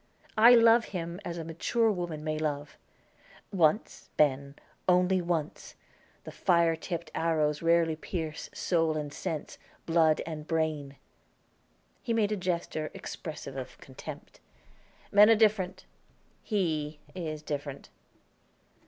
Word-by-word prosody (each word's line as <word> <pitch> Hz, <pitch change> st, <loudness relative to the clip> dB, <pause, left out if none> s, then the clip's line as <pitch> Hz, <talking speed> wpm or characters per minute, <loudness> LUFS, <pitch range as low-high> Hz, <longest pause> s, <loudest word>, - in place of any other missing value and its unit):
I 240 Hz, +3 st, +9 dB
love 230 Hz, 0 st, +6 dB
him, 170 Hz, -1 st, -5 dB
as 170 Hz, 0 st, -5 dB
a 165 Hz, -, -4 dB
mature 215 Hz, +8 st, +1 dB
woman 175 Hz, -5 st, -4 dB
may 155 Hz, 0 st, -2 dB
love, 145 Hz, -1 st, -3 dB, 0.8 s
once, 175 Hz, +3 st, +1 dB
Ben, 140 Hz, -1 st, +2 dB, 0.3 s
only 180 Hz, +1 st, +4 dB
once; 170 Hz, -3 st, -3 dB, 0.5 s
the -, -, -8 dB
fire 170 Hz, -2 st, +2 dB
tipped 170 Hz, 0 st, -5 dB
arrows 155 Hz, -2 st, +1 dB
rarely 165 Hz, -1 st, +3 dB
pierce 160 Hz, -1 st, -5 dB
soul 165 Hz, -3 st, 0 dB
and 145 Hz, -1 st, -4 dB
sense, 155 Hz, -1 st, -5 dB, 0.3 s
blood 165 Hz, -2 st, +3 dB
and 155 Hz, -2 st, -6 dB
brain." 155 Hz, -4 st, -1 dB, 1.1 s
He 235 Hz, -, -2 dB
made 215 Hz, -2 st, +2 dB
a -, -, +1 dB
gesture, 170 Hz, -4 st, -2 dB
expressive 150 Hz, -4 st, -7 dB
of 130 Hz, -2 st, -7 dB
contempt. 130 Hz, -, -10 dB, 0.7 s
"Men 205 Hz, +1 st, +7 dB
are 225 Hz, -, +7 dB
different; 195 Hz, -4 st, +1 dB, 0.6 s
he 160 Hz, -8 st, -1 dB, 0.2 s
is 155 Hz, -4 st, -5 dB
different." 145 Hz, -2 st, -5 dB
165 Hz, 120 wpm, -29 LUFS, 155-185 Hz, 1.1 s, I